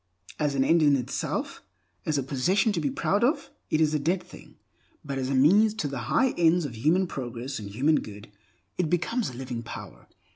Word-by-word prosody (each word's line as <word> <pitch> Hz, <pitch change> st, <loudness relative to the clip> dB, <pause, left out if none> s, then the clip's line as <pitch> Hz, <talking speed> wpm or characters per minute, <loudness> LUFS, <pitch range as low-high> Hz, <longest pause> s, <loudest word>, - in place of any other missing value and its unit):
As 145 Hz, -2 st, 0 dB
an 135 Hz, -, +3 dB
end 165 Hz, +4 st, +4 dB
in 145 Hz, -2 st, +5 dB
itself, 125 Hz, -3 st, -3 dB, 0.5 s
as 155 Hz, -2 st, +1 dB
a 140 Hz, -, 0 dB
possession 180 Hz, -, +1 dB
to 175 Hz, -5 st, -1 dB
be 145 Hz, -, 0 dB
proud 200 Hz, -, 0 dB
of, 275 Hz, +7 st, +1 dB, 0.2 s
it 155 Hz, -, +1 dB
is 155 Hz, -1 st, +3 dB
a 150 Hz, -, +1 dB
dead 175 Hz, +5 st, 0 dB
thing; -, -, -15 dB, 0.5 s
but 140 Hz, -1 st, -3 dB
as 130 Hz, 0 st, -2 dB
a 135 Hz, -, 0 dB
means 205 Hz, +11 st, +5 dB
to 160 Hz, -, -2 dB
the 135 Hz, -2 st, -4 dB
high 265 Hz, -2 st, +3 dB
ends 170 Hz, 0 st, +4 dB
of 125 Hz, -5 st, -6 dB
human 160 Hz, +11 st, +2 dB
progress 125 Hz, -4 st, -5 dB
and 100 Hz, -2 st, -7 dB
human 140 Hz, +10 st, +2 dB
good 105 Hz, 0 st, -10 dB, 0.5 s
it 170 Hz, -4 st, +1 dB
becomes 210 Hz, +8 st, 0 dB
a -, -, -10 dB
living 125 Hz, -1 st, -5 dB
power. 115 Hz, -, -10 dB
145 Hz, 210 wpm, -27 LUFS, 130-175 Hz, 0.5 s, in